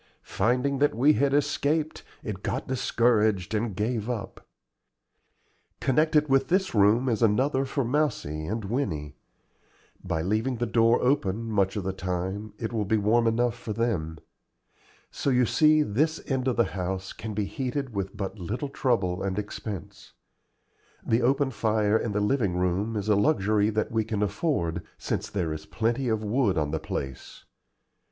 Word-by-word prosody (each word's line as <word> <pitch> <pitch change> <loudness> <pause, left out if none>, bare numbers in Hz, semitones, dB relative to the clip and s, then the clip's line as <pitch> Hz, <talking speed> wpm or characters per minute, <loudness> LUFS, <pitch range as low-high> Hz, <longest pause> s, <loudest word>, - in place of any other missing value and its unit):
Finding 130 +3 0
that 145 -5 +2
we 140 +6 +5
had 140 -2 +2
escaped, 150 +2 0 0.2
it 100 -3 -5
got - - -3
discouraged 110 -6 +1
and 110 -2 -1
gave 110 +2 -1
up. 115 -4 -5 1.4
Connected 150 +3 +2
with 135 -1 +3
this 190 +2 +1
room 110 +4 +4
is 115 -3 0
another 130 +5 +2
for 135 -1 -1
Mousie 115 - -1
and 110 +1 -3
Winnie. 95 - -2 0.9
By 80 0 -2
leaving 110 +7 0
the 120 +1 -1
door 115 +1 +3
open 115 -5 +1
much 100 -2 +1
of 105 - -2
the 95 0 -2
time 95 +3 -4
it 110 +2 -4
will 110 -2 0
be 110 +2 +1
warm 115 +3 +3
enough 120 +1 +2
for 115 -2 -5
them. 95 -9 -1 0.9
So - - -2
you 125 -1 +4
see 155 +6 +4
this 155 +8 0
end 130 -1 -1
of 125 - +1
the 120 - +4
house 95 0 -3
can 110 -1 -6
be 105 -1 0
heated 130 +2 -3
with 100 0 -4
but 100 +1 -4
little 110 - -3
trouble 100 -10 0
and 95 -1 -2
expense. 105 -2 -6 0.9
The 115 +2 +2
open 135 +2 +2
fire 110 -2 +1
in 110 0 0
the 105 - 0
living 105 -4 +1
room 90 +5 0
is 105 -1 -3
a 105 - +4
luxury 105 -3 +2
that 110 0 -1
we 110 -1 +1
can 105 -2 -2
afford, 100 - -1 0.2
since - - -3
there 85 -6 -2
is 80 0 -8
plenty 120 +7 -1
of 110 -1 0
wood 105 -3 +1
on 75 -2 0
the 80 - -1
place. 65 -3 -6
110 Hz, 165 wpm, -27 LUFS, 100-130 Hz, 1.4 s, we